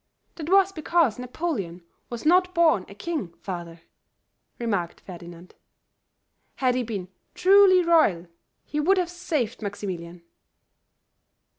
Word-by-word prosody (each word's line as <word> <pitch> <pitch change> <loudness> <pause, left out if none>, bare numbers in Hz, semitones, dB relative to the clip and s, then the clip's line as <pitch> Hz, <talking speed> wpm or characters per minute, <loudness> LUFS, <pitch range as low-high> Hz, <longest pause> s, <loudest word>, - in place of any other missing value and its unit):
"That 315 -1 -7
was 390 0 +5
because 320 - +1
Napoleon 250 - -4 0.3
was 240 +2 -7
not 365 +3 +3
born 320 - +3
a 200 - -12
king, 270 - -4
father," 170 -3 -7 0.8
remarked 200 -8 -2
Ferdinand. 175 0 -11 1.0
"Had 255 -2 +1
he 255 - 0
been 210 -6 -5 0.3
truly 375 -1 +6
royal, 310 - +3 0.4
he 300 - -3
would 375 +6 +3
have 355 -2 0
saved 310 -11 -3
Maximilian." 180 -4 -6
250 Hz, 115 wpm, -25 LUFS, -, 1.0 s, truly